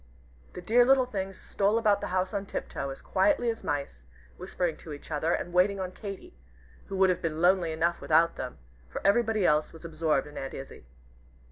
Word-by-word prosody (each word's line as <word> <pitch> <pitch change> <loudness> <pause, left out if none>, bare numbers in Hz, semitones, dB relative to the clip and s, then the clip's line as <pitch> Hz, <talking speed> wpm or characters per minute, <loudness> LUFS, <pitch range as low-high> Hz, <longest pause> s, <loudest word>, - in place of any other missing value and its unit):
The 180 - -8
dear 240 +6 +5
little 260 +1 +5
things 195 -5 -5
stole 205 +2 +1
about 210 -3 +3
the - - -3
house 185 +1 -1
on 200 -1 -3
tiptoe, 140 - -4
as 135 - -8
quietly 280 -6 +2
as 225 - -9
mice, 140 - -4 0.3
whispering 170 - -2
to 155 - -9
each 145 - -11
other, 155 +2 0
and 175 - -2
waiting 195 +2 +3
on 185 -1 -3
Katy, 195 - -8 0.5
who 195 - -4
would 190 -1 +5
have 180 - -2
been 160 -2 -2
lonely 175 -1 +3
enough 170 +2 0
without 165 +2 +3
them, 125 -1 -6 0.3
for - - -5
everybody 215 -1 +3
else 150 -1 +2
was 165 +1 -13
absorbed 155 -3 0
in 150 0 -8
Aunt 135 - -6
Izzie. 135 - -10
180 Hz, 200 wpm, -28 LUFS, 155-200 Hz, 0.5 s, dear